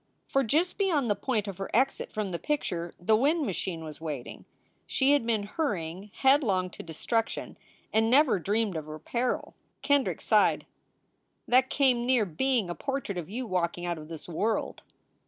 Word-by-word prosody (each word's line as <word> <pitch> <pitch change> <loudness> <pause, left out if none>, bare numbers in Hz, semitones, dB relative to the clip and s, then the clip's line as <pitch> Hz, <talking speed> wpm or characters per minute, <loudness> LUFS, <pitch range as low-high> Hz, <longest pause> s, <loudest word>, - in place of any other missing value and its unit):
For 275 - +2
just 325 - +1
beyond 305 - +2
the - - +2
point 220 -4 -1
of 195 -1 -6
her 195 - -4
exit 265 +3 +1
from 210 -2 -2
the 170 -2 -4
picture 175 - -2
the 215 +5 +3
wind 295 +7 +2
machine 180 -5 -3
was 155 0 -9
waiting. 150 -6 -6 0.4
She 270 +1 +2
had 285 -5 +3
been 220 -3 +1
hurry 205 - -2
ing 195 +4 -11
headlong 225 -10 +3
to - - -9
destruction 225 +8 -2 0.4
and 220 +1 +3
never 265 -5 +5
dreamed 205 +1 0
of 155 -1 -4
her 155 0 -6
peril. 240 +10 -1
SOULS - - -11
FOR - - -18
SALE - - -16
313 285 - +6
Kendrick 280 - -1
sighed, - - +3 0.8
"That 255 +1 +4
came 250 -4 +2
near 250 -4 +4
being 225 +5 0
a - - -1
portrait 270 -6 -3
of 165 - -7
you 245 +5 -4
walking 175 -3 -1
out 170 -2 -2
of 155 - -10
this 160 -1 -9
world." 210 +6 -1
215 Hz, 190 wpm, -28 LUFS, 175-265 Hz, 0.8 s, 313